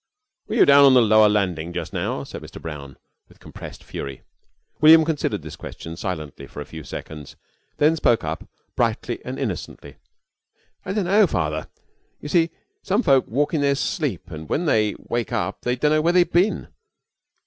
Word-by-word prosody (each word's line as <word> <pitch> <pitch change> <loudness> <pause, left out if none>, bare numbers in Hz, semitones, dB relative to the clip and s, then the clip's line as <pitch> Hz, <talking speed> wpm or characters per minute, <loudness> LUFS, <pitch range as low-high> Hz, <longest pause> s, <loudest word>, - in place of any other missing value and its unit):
"Were - - -3
you - - +6
down 140 0 +7
on 135 -1 +6
the 125 - +7
lower 110 -1 +5
landing 90 -5 -1
just 85 - -5
now?" - - -2
said - - -9
Mr. - - -10
Brown, 70 -5 -8 0.3
with - - -22
compressed - - -11
fury. 70 -2 -7 0.6
William 160 +1 +8
considered 140 - -2
this 80 - -8
question 80 0 -9
silently 75 -6 -6
for - - -10
a 75 - -5
few 80 -1 -9
seconds, 75 0 -8 0.4
then 155 +2 +4
spoke 120 -7 +2
up 80 +1 -5 0.3
brightly - - -1
and - - -6
innocently. - - -5 0.9
"I 190 - -3
dunno, 205 0 +3
Father. 75 - -2 0.5
You 145 - -7
see, 165 +1 +3 0.3
some 205 +6 0
folks 135 -2 +3
walk 145 +7 0
in 155 - +1
their 140 -1 +2
sleep 125 - -3
and 80 -1 -8
when 175 - 0
they 105 -8 +2
wake 120 -3 -2
up - - -2
they 125 0 0
dunno 150 +4 +2
where 170 +2 +2
they've 180 -1 +3
bin. 185 +5 +2
120 Hz, 175 wpm, -22 LUFS, -, 0.9 s, William